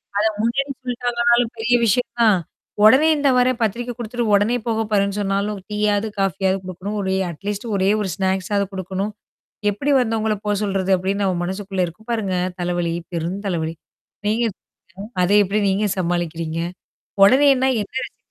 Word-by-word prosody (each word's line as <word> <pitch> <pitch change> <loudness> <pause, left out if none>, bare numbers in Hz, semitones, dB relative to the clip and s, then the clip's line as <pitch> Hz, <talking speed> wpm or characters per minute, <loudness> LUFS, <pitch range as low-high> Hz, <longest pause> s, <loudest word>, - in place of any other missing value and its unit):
ஆ. - - 0
அத 215 - +3
முன்னாடி 275 +5 0
சொல்லிட்டாங்கனாலும் 240 -1 +1
பெரிய 235 +2 +2
விஷயம் 235 +3 +2
தான். 215 -4 +5 0.5
உடனே 260 +8 +7
இந்தா 285 -2 +2
வறேன். 250 0 +2
பத்திரிக்க 235 +3 -1
குடுத்துட்டு 240 0 -3
உடனே 205 +4 +2
போக 225 -1 +1
போறேன்னு 200 -1 +1
சொன்னாலும் 200 +1 -1
டீயாவது, 210 0 +1
காஃபியாவது 190 0 +1
குடுக்கணும். 185 +3 -5
ஒரே 190 -1 0 0.2
அட்லீஸ்ட் 200 +6 -5
ஒரே 190 0 +2
ஒரு 200 - -2
ஸ்நாக்ஸாவது 195 +1 0
குடுக்கணும். 190 +2 -3 0.6
எப்படி 240 +9 -2
வந்தவங்கள 220 -2 0
போக 210 0 +1
சொல்றது 195 -2 -1
அப்டின்னு 195 +3 -1
நம்ம 185 -2 +1
மனசுக்குள்ள 190 0 -2
இருக்கும் 195 +7 -13
பாருங்க 210 -5 -1 0.3
தலைவலி. 175 -1 -1 0.2
பெரும் 170 +3 -2
தலைவலி. 165 -3 -2 0.5
நீங்க 220 +3 +1
சொல்லுங்க. 195 +3 -14
அத 180 - +1
எப்படி 200 +3 0
நீங்க 200 +2 +1
சமாளிக்கிறீங்க? 170 -2 -2 0.7
உடனேனா 265 +3 +5
என்ன 205 - -12
ரெசிபி - - -13
205 Hz, 150 wpm, -21 LUFS, 190-230 Hz, 0.7 s, உடனே